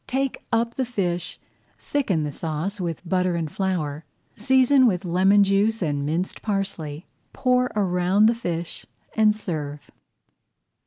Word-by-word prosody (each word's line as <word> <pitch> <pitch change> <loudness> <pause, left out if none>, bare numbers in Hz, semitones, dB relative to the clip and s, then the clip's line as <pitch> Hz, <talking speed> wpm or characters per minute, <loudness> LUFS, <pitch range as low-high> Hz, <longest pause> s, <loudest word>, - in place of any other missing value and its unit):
Take 270 0 -2
up 230 0 +1
the 265 - +1
fish, 180 -7 -2 0.4
thicken 200 - -1
the 150 - -3
sauce 165 +7 -3
with 170 0 -4
butter 180 0 +1
and 160 -3 -3
flour, 160 -6 -2 0.3
season 260 +3 +4
with 185 -3 0
lemon 190 +4 +4
juice 200 +2 +2
and 145 -3 -1
minced 165 +6 -2
parsley, 190 -7 -3 0.3
pour 250 -1 +2
around 190 0 +2
the 225 - +5
fish, 175 -7 -4 0.3
and 215 -1 +4
serve. 150 -8 -5
190 Hz, 135 wpm, -24 LUFS, 165-220 Hz, 0.4 s, the